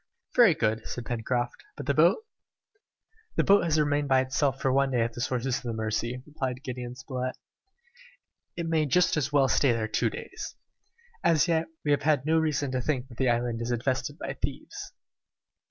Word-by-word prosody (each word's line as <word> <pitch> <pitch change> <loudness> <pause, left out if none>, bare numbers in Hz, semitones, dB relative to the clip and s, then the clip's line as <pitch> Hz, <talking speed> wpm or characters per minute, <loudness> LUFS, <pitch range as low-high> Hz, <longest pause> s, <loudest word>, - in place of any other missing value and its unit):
"Very 230 -9 +7
good," 110 -2 0
said 120 - -5
Pencroft. 120 +1 -2
"But - - -6
the - - +1
boat?" 440 - +4 1.1
"The - - +3
boat 200 -3 +5
has 155 -2 +2
remained 145 -1 +1
by 130 -1 +4
itself 135 +1 0
for 130 - +1
one 140 0 +3
day 125 -3 +1
at 115 0 0
the 120 - -6
sources 125 +1 0
of - - -7
the 120 -2 -4
Mercy," 110 +3 -2
replied 135 -4 -4
Gideon 125 -1 -5
Spilett; 130 -1 -4 1.2
"it 170 - -2
may 160 -2 +1
just 180 +6 +3
as 150 -2 0
well 140 -2 +4
stay 130 0 +3
there 110 -1 -1
two 110 - +1
days! - - -7 0.7
As 155 -4 +4
yet, 165 -1 +1 0.2
we 145 - +2
have 145 - +3
had 145 -3 +2
no 160 +1 +3
reason 150 -3 0
to 130 -1 -1
think 130 -1 -2
that 120 - -14
the 130 -2 +3
island 120 -1 0
is 115 - -3
infested 130 +4 -1
by - - -4
thieves!" - - -5
130 Hz, 190 wpm, -28 LUFS, 120-150 Hz, 1.2 s, Very